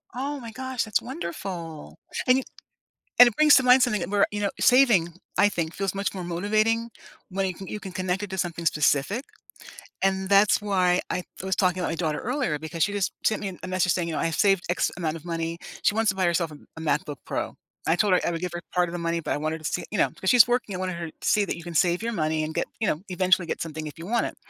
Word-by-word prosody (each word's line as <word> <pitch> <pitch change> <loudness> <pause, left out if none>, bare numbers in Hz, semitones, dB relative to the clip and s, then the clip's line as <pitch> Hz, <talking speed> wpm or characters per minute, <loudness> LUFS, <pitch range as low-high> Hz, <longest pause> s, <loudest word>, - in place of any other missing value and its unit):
Oh 280 +3 -3
my 230 - -8
gosh, 260 -1 -3
that's 215 -1 +1
wonderful. 170 - -6 0.3
And 255 +1 +5
you 265 - -3 0.7
and 245 - +10
it 235 - -1
brings 305 -1 +7
to 265 - +5
mind 250 +1 +6
something 215 -5 +2
th 170 - -3
where, 205 -1 +3
you 205 0 -3
know, 200 - 0
saving, 245 -9 +5 0.3
I 205 - +6
think, 165 -3 -3
feels 195 -1 -2
much 200 +1 -1
more 185 -2 -5
motivating 215 +6 0 0.4
when 195 +1 -1
you 185 - -3
can 195 - -9
you 210 - -5
can 190 -2 -8
connect 185 +1 -1
it 200 - -5
to 190 - -4
something 170 -2 -3
specific, 150 - +1 0.8
and 190 0 +1
that's 200 +1 +5
why 185 -3 +2
I 180 - -2 0.2
was 190 0 0
talking 185 -1 +1
about 180 - -1
my - - -2
daughter 155 -3 -1
earlier 245 - -1
because 160 +1 -2
she 205 - 0
just 200 -2 0
sent 215 - +2
me 190 -3 -5
a 185 - -4
message 185 -1 +1
saying, 170 -2 -1
you - - -3
know, - - -1
"I've 165 -1 0
saved 195 -2 +3
X 175 - +1
amount 160 -2 -2
of 160 - -15
money," 165 -1 -3 0.3
she 205 - +3
wants 225 -2 +2
to 190 - 0
buy 185 - +1
herself 170 -2 0
a 150 - -10 0.2
a - - -6
MacBook 150 -2 -1
Pro. - - -3 0.3
I 165 - +4
told 200 +1 +2
her 180 - +5
I - - +1
would 165 0 -4
give 180 - -2
her 175 - -4
part 180 -1 +2
of 170 - -8
the 175 - -3
money, 170 0 -1
but - - 0
I - - -1
wanted 160 +1 -2
to 155 - -11
see, - - -1
you 210 - -2
know - - +3
‘cause 190 - +1
she's 245 -3 +8
working, 240 -5 -1
I 180 - -4
wanted 185 -2 -3
her 170 - -3
to - - -19 0.2
see 210 -1 +3
that - - -3
you 170 - -9
can 175 0 -7
save 175 +5 +2
your 235 - -1
money 155 -4 0
and 155 +1 -4
get - - -1
you 220 - +1
know, 155 - 0
eventually 185 -1 +2
get - - -3
something 155 -1 -6
if 150 - -10
you 165 - -8
want 235 +4 +1
it. - - -14
185 Hz, 275 wpm, -25 LUFS, 170-210 Hz, 0.8 s, and